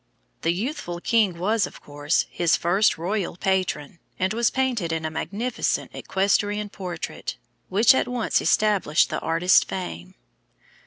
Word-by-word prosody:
The 165 - +2
youthful 180 - -4
king 205 -3 +2
was, 210 +5 +1
of - - -13
course, 145 +2 -1
his 170 -2 +2
first 190 +6 +2
royal 180 +1 -2
patron, 185 -5 -1 0.2
and 190 +2 0
was 235 +1 +2
painted 245 -10 -1
in 160 -1 -2
a 155 - -2
magnificent 220 +9 -2
equestrian 205 +2 0
portrait, 180 -4 -6 0.3
which 215 +6 +5
at - - +1
once 245 -2 0
established 200 -8 +2
the - - -1
artist's 165 +3 +3
fame. 90 - -6
190 Hz, 140 wpm, -24 LUFS, 170-215 Hz, 0.3 s, which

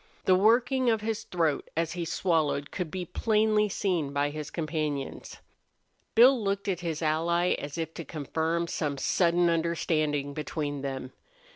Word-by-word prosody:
The 185 - +5
working 240 +6 +3
of 220 -2 +1
his 220 0 -3
throat 165 -5 -1
as 165 -1 0
he 170 -1 -3
swallowed 160 -4 0
could 180 -4 -3
be 180 +2 -4
plainly 215 +2 +2
seen 175 -8 -1
by 145 +1 0
his 150 0 -6
companions. 155 -4 -3 0.8
Bill 245 +1 +6
looked 200 0 -1
at 185 -3 0
his 165 -2 -3
ally 170 +3 +1
as 145 +1 -6
if 165 -1 -3
to 165 - -6
confirm 160 +3 -2
some 150 -4 -2
sudden 175 +5 +2
understanding 155 -4 0
between 145 -1 -3
them. 135 -1 -5
165 Hz, 150 wpm, -28 LUFS, 150-190 Hz, 0.8 s, Bill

